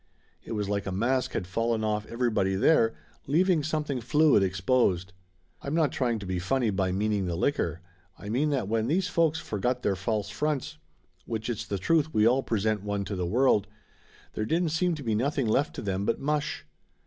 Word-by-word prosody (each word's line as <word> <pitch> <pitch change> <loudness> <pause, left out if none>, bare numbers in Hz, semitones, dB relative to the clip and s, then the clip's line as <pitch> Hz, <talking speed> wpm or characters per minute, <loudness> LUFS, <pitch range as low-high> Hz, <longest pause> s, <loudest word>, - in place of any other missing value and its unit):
It - - -6
was 105 -2 -2
like 100 0 -2
a - - -2
mask 120 +7 0
had - - -2
fallen 115 +4 -1
off 105 0 -1
everybody 115 -5 0
there, 115 +1 +3 0.3
leaving 170 +3 +3
something 150 -3 -2
fluid 150 0 +4
exposed. 95 -1 +1 0.5
I'm 140 +3 -3
not 160 -3 +2
trying 120 -3 0
to 100 - -7
be 90 -1 -2
funny 115 +5 0
by 95 -1 0
meaning 100 0 0
the 85 - -2
liquor. 90 - -1 0.4
I - - -10
mean 130 +8 +1
that 135 -9 -1
when 110 +1 0
these 180 +6 +1
folks 165 -3 +2
forgot 125 -2 -2
their 100 - +1
false 105 +2 -2
fronts, 150 - -2 0.5
which 115 +1 -3
it's 115 - -5
the 100 - -2
truth 155 - +1
we 110 +1 +5
all 130 +3 +3
present 110 -3 0
one 100 -1 -2
to 100 +1 -4
the 90 -2 -2
world, 115 0 +3 0.7
there 110 - -2
didn't 165 +7 +1
seem 170 +2 +1
to 145 - -8
be 115 -3 0
nothing 135 +4 0
left 135 +7 +1
to - - -5
them 100 -1 -1
but - - 0
mush. 150 +1 -2
115 Hz, 195 wpm, -28 LUFS, 100-145 Hz, 0.7 s, we